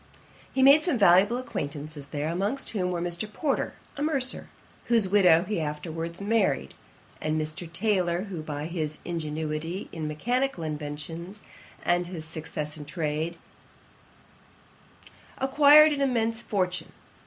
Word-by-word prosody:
He 265 - +2
made 280 +3 +8
some 330 -6 0
valuable 200 +3 +5
acquaintances 145 - -5
there, 145 +2 -3
amongst 200 +10 -1
whom 185 -5 -1
were 175 -1 -2
Mr. 175 +4 -2
Porter, 280 +5 -1 0.2
a - - -4
mercer, 275 -4 0 0.4
whose 230 -5 +3
widow 180 -4 +5
he 205 -1 -2
afterwards 165 +2 -4
married, 200 - +1 0.5
and 155 0 0
Mr. 155 +2 -4
Taylor, 180 -2 +1
who 190 -6 -6
by 150 -1 -5
his 155 -3 -3
ingenuity 160 +1 -3
in 160 -2 -4
mechanical 245 - -1
inventions, 155 +6 -6 0.4
and 175 0 +2
his 170 -3 -6
success 155 -1 -4
in 150 - -8
trade, 155 +1 -2 2.0
acquired 295 +3 +7
an 285 -1 -1
immense 230 -4 +1
fortune. 185 -5 -2
175 Hz, 130 wpm, -27 LUFS, 155-220 Hz, 2.0 s, made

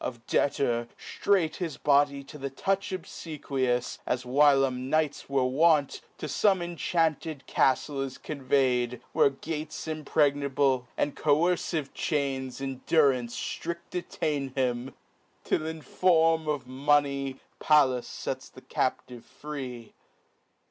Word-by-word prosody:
Of 120 -2 -5
debtor, 120 -4 +1
ftrait 185 -6 0
his 170 -5 -4
body, 140 -1 +3
to 150 +2 -11
the 140 0 -3
touch 195 +8 -1
Obfequious, 135 -8 -3
(as 125 0 -1
whilom 135 -1 +3
knights 155 -2 0
were 135 -2 +2
wont) 150 +2 +3 0.2
To - - -5
fome 195 -4 +2
inchanted 160 -2 -1
caftle 135 +1 +1
is 135 -1 -6
convey'd, 130 -4 0
Where - - +5
gates 155 +2 -6
impregnable, 140 -4 +1
and 145 - 0
coercive 155 -1 +1
chains 135 -5 -2
In 135 -1 -5
durance 130 -7 +3 0.3
Uriel: 170 +1 -3
detain 145 -6 -3
him, 125 -1 -1 0.5
till 155 - 0
in 160 -1 -6
form 165 -3 +3
Of 145 -4 -1
money, 140 0 +1 0.2
Pallas 135 -5 +2
fets - - -4
the - - -14
captive 120 -2 -2
free. 130 -6 -8
140 Hz, 120 wpm, -28 LUFS, 130-155 Hz, 0.5 s, Where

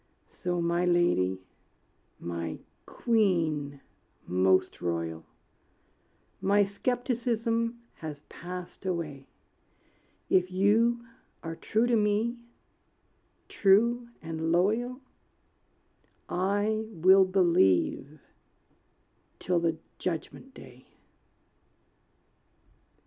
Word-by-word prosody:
So 175 -1 -3
my 170 +1 +1
lady, 135 - +2 0.8
my 85 -1 -4 0.3
queen 160 - 0 0.4
most 95 +1 +2
royal, 85 -2 -3 1.1
My 200 +1 +4
skepticism 230 +1 -1 0.2
has 150 -3 -7
passed 180 +3 -9
away; 160 -7 -4 1.0
If 185 -1 +3
you 225 +5 +2 0.4
are 165 -1 -5
true 220 +7 0
to 240 -1 +2
me, 215 +3 +1 1.1
true 235 +5 +3
and 160 0 -3
loyal, 225 +9 +1 1.3
I 205 +4 0
will 190 0 +5
believe 155 - +2 1.2
till 180 -1 0
the 165 -1 0 0.2
Judgment 185 +9 -5
day. - - -14
180 Hz, 75 wpm, -28 LUFS, 155-220 Hz, 1.3 s, will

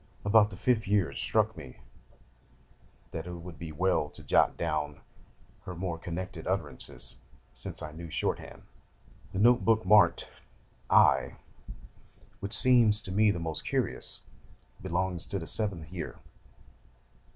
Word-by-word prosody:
About 105 0 +5
the 95 - -9
fifth 120 -2 +1
year 100 -3 +2
it - - -5
struck - - +1
me 65 - -10 1.4
that 80 +1 -5
it 90 - -6
would 85 -1 -10
be 80 -2 -6
well 80 -2 +1
to - - -13
jot - - +3
down 75 -3 -2 0.7
her 90 - -6
more 85 -2 -3
connected 90 0 -6
utterances, 75 -9 -3 0.4
since - - -4
I 75 - -6
knew 85 +2 -9
shorthand. 75 - -3 0.7
The - - -5
note 120 +4 +5
book 110 -1 +3
marked 105 +2 +5 0.6
"I.," - - +4 1.0
which 100 +2 +3
seems 120 -5 +5
to 95 - -7
me 105 +3 +4
the 100 - 0
most 80 -2 -4
curious, - - -2 0.6
belongs 90 -1 -2
to 100 - -4
the 85 - -5
seventh 90 -6 -1
year. 90 - -5
90 Hz, 140 wpm, -29 LUFS, 80-105 Hz, 1.4 s, About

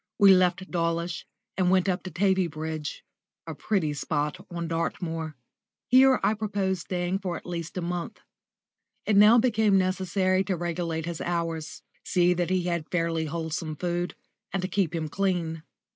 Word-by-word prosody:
We 200 -3 +8
left 185 0 +2
Dawlish 170 0 -1 0.3
and 185 -1 +3
went 185 0 +3
up 180 -2 0
to 185 - -7
Tavybridge 160 -5 -1 0.4
a 165 - -5
pretty 160 -2 0
spot 145 0 -2
on 170 -1 -4
Dartmoor. 165 -1 -3 0.5
Here 260 +1 +6
I 215 - +3
proposed 200 -4 -1
staying 180 +1 -2
for 180 -4 -3
at - - -12
least 175 0 -5
a - - -1
month. 175 0 -4 0.9
It 215 - +2
now 210 +4 +8
became 220 -4 +3
necessary 185 0 +1
to 190 - 0
regulate 165 -1 -2
his 170 -1 -4
hours, 165 -2 -3 0.2
see 180 -1 +3
that 175 0 -1
he 185 -1 +1
had 170 -3 -2
fairly 165 -2 0
wholesome 160 0 -3
food, 175 +2 -2 0.4
and 185 -1 -2
keep 185 -5 0
him 160 -1 -2
clean. 170 -2 -1
175 Hz, 155 wpm, -27 LUFS, 165-190 Hz, 0.9 s, We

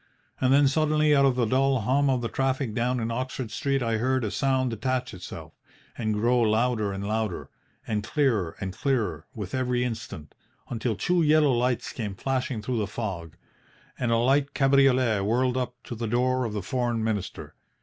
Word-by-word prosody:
And 130 0 +2
then 140 +1 +6
suddenly 155 +1 +3
out 140 -1 +5
of 130 - +2
the 125 -2 +2
dull 130 +2 +2
hum 135 +6 +2
of 130 -2 +1
the 115 - -1
traffic 135 -2 -1
down 125 +3 0
in 115 0 -2
Oxford 130 -1 -4
Street 135 -2 0
I 115 -1 0
heard 130 +2 +1
a 105 - -2
sound 130 +3 +1
detach 125 +2 -2
itself, 90 -1 -9 0.4
and 110 -2 -1
grow 120 +4 +2
louder 110 -1 +1
and 100 +1 -4
louder, 110 -3 -2 0.3
and 105 -2 -2
clearer 110 - 0
and 95 -2 -4
clearer 110 - -1
with - - -6
every 125 -1 0
instant, 110 -11 -6 0.4
until 115 -1 -2
two 175 - +1
yellow 150 -2 +4
lights 125 0 0
came 105 -5 -4
flashing 130 -1 -2
through 120 0 -1
the 105 - -1
fog, 95 -7 -5 0.6
and 120 -2 0
a 115 - +4
light 135 +4 +2
cabriolet 135 -5 +4
whirled 125 +4 +1
up 125 -1 -2
to - - -7
the 115 0 -4
door 125 +2 +1
of 110 - -4
the 105 -3 -3
Foreign 120 +1 -1
Minister. 110 -4 -3
125 Hz, 185 wpm, -26 LUFS, 110-130 Hz, 0.6 s, then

